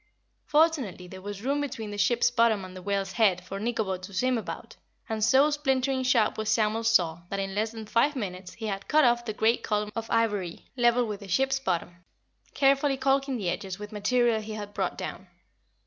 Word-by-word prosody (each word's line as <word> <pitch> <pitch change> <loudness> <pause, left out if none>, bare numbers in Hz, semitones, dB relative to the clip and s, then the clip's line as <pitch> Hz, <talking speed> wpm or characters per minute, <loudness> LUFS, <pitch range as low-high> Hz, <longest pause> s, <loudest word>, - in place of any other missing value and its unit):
Fortunately 295 - +1
there 185 +1 -10
was 205 +1 -7
room 280 +3 0
between 225 -7 -5
the 205 - -6
ship's 240 +2 +3
bottom 230 -5 +2
and 185 0 -11
the 185 - -8
whale's 195 0 -1
head 190 -6 +2
for 195 +2 -6
Nikobo 215 -4 -1
to 190 +2 -10
swim 255 +6 +2
about, 225 - -6 0.3
and 220 -1 -2
so 275 +6 +5
splintering 270 -2 0
sharp 245 -5 +2
was 215 0 -2
Samuel's 220 +1 +2
saw 170 -6 +2
that 195 - -3
in 195 0 -3
less 215 +3 0
than 220 -1 -8
five 235 +7 +2
minutes 185 -6 -5
he 225 - -7
had 200 -2 -4
cut 310 -2 +4
off 240 0 +2
the 220 - -2
great 220 +2 +2
column 210 -1 -1
of 225 0 -4
ivory 205 -6 0
level 240 0 +3
with 210 -2 -5
the 200 - -10
ship's 270 +7 +1
bottom, 175 -6 -2 0.6
carefully 275 0 +3
calking 270 0 +1
the 185 -6 -1
edges 190 -1 -5
with 210 +1 -8
material 230 +1 +1
he 215 0 -7
had 205 -1 -7
brought - - -2
down. - - -6
220 Hz, 205 wpm, -27 LUFS, 200-255 Hz, 0.6 s, so